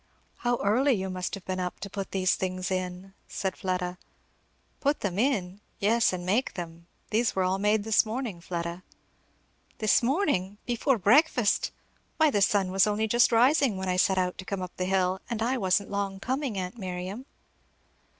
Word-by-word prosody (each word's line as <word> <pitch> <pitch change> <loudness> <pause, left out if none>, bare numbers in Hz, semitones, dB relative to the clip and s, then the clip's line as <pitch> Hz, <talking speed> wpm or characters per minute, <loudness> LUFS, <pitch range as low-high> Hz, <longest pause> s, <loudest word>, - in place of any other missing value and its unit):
"How 245 0 0
early 255 +7 +3
you 190 -3 -2
must 185 +1 -3
have 195 - -11
been 185 0 -3
up, 180 -1 -4
to - - -4
put 195 -1 -5
these 185 -1 +1
things 185 0 -3
in," 185 +1 -4
said 190 -1 -3
Fleda. 180 -1 -3 0.8
"Put 285 +1 0
them 195 -1 -2
in! 205 -7 0 0.2
yes, 225 +3 +3
and 180 -1 -4
make 215 +8 0
them. 170 -1 -7 0.2
These 230 +2 +1
were 190 - +2
all 185 +1 0
made 210 +1 +2
this 220 0 +4
morning, 220 -5 -4
Fleda." 170 0 -4 1.0
"This 215 -2 +3
morning! 235 - 0
before 245 +2 +1
breakfast! 240 - +3 0.5
Why 315 -2 +4
the 205 - +1
sun 195 -2 +2
was 190 +1 +4
only 210 +1 0
just 240 +3 +4
rising 245 -1 +4
when 190 0 -3
I 180 - +1
set 190 +1 +3
out 180 0 0
to - - -5
come 195 -1 -3
up 180 - -8
the 185 - -1
hill; 185 0 +1
and 230 -2 -2
I 245 +3 0
wasn't 195 0 +1
long 200 -1 -2
coming, 260 0 -2
aunt 185 +5 -4
Miriam." 185 +6 -5
195 Hz, 180 wpm, -28 LUFS, 185-230 Hz, 1.0 s, this